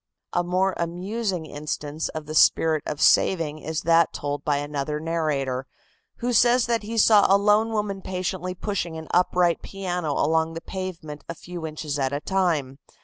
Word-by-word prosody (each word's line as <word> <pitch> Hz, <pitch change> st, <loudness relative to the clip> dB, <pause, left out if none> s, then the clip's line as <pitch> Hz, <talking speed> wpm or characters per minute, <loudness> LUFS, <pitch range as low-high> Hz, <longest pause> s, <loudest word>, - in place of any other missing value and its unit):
A 175 Hz, -, +2 dB
more 185 Hz, +2 st, +1 dB
amusing 180 Hz, +2 st, -2 dB
instance 150 Hz, 0 st, -4 dB
of 155 Hz, -1 st, -6 dB
the 155 Hz, -, -6 dB
spirit 160 Hz, 0 st, +4 dB
of 150 Hz, -, -4 dB
saving 155 Hz, -5 st, +3 dB
is 160 Hz, +1 st, -3 dB
that 165 Hz, 0 st, +4 dB
told 145 Hz, 0 st, -4 dB
by 145 Hz, -1 st, +1 dB
another 145 Hz, +1 st, -3 dB
narrator, 145 Hz, -5 st, -1 dB, 0.5 s
who 245 Hz, +1 st, -2 dB
says 240 Hz, +1 st, +4 dB
that 230 Hz, -1 st, 0 dB
he 225 Hz, +2 st, -5 dB
saw 210 Hz, -1 st, +6 dB
a 195 Hz, -, +7 dB
lone 210 Hz, +2 st, +3 dB
woman 205 Hz, -3 st, -2 dB
patiently 185 Hz, -1 st, -3 dB
pushing 175 Hz, -4 st, -3 dB
an 160 Hz, -1 st, -8 dB
upright 180 Hz, -1 st, +2 dB
piano 180 Hz, -5 st, -3 dB
along 160 Hz, +2 st, +1 dB
the -, -, -3 dB
pavement 170 Hz, -6 st, -6 dB
a 170 Hz, -, -4 dB
few 170 Hz, -1 st, -7 dB
inches 150 Hz, -2 st, -4 dB
at 135 Hz, 0 st, 0 dB
a 145 Hz, -, -1 dB
time. 155 Hz, -7 st, 0 dB
170 Hz, 170 wpm, -24 LUFS, 150-190 Hz, 0.5 s, a